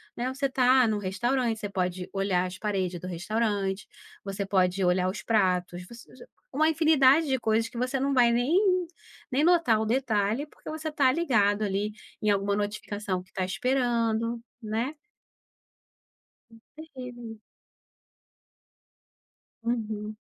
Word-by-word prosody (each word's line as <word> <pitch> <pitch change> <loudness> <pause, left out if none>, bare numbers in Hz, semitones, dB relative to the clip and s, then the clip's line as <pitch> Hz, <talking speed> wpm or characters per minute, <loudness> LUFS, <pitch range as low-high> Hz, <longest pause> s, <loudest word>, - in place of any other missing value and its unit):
né. 245 +1 -2
Você 275 0 0
está 255 -1 +4
num 215 -1 0
restaurante 225 +5 0
você 205 - -4
pode 180 -1 -2
olhar 195 -2 +1
as 185 0 -6
paredes 185 -4 -2
do 180 - -7
restaurante 195 +1 -2 0.4
você 195 0 -3
pode 190 -1 +1
olhar 180 +1 +2
os 190 -1 -5
pratos, 180 -4 0
você 235 +1 -14
já 250 - -13 0.3
uma 310 +4 +2
infinidade 310 -2 +4
de 265 -1 +1
coisas 225 0 +1
que 235 - -10
você 255 +2 -1
não 275 +1 0
vai 240 -2 +5
nem 360 - +2 0.5
nem 280 +4 +2
notar 330 -11 +4
o - - -1
detalhe 225 +1 0
porque - - -12
você 315 0 -4
está 280 -4 +3
ligado 215 -9 +2
ali 205 +1 -1 0.3
em 210 - +1
alguma 200 0 +1
notificação 205 -2 -3
que 185 - -27
está 185 - -3
esperando, 230 0 0 0.2
né. 225 +7 -2 1.6
Hum, 225 0 -17 0.2
terrível. 245 -7 -9 2.2
Uhum. 215 -2 -3
225 Hz, 140 wpm, -27 LUFS, 195-260 Hz, 2.2 s, vai